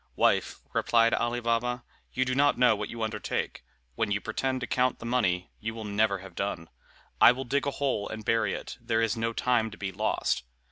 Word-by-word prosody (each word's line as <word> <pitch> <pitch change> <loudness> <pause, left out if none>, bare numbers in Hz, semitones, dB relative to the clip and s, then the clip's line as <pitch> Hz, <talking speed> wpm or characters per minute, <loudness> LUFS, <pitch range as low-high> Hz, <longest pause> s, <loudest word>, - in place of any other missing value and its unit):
"Wife," - - +2
replied 115 -1 +3
Ali 120 +1 0
Baba, 120 +1 0 0.3
"you 130 - 0
do 130 - -1
not 145 +2 +3
know 125 -3 +5
what 105 0 -4
you 115 -1 -4
undertake, 110 -1 -3 0.3
when 110 - -1
you 100 0 +1
pretend 130 +5 -2
to - - -1
count 125 0 +1
the - - -9
money; 95 -8 0
you 110 +1 -4
will 110 - -6
never 105 0 +1
have 95 - -11
done. 90 -4 -3 0.5
I - - +10
will 130 +2 -3
dig 140 +3 0
a - - +1
hole 130 -8 -1
and 110 -1 -7
bury 115 0 +2
it. - - -8
There 115 0 +1
is 115 +1 +1
no 115 0 -1
time 115 -1 +1
to 105 - -11
be 95 -1 -3
lost." 85 - 0
115 Hz, 215 wpm, -28 LUFS, 105-125 Hz, 0.5 s, I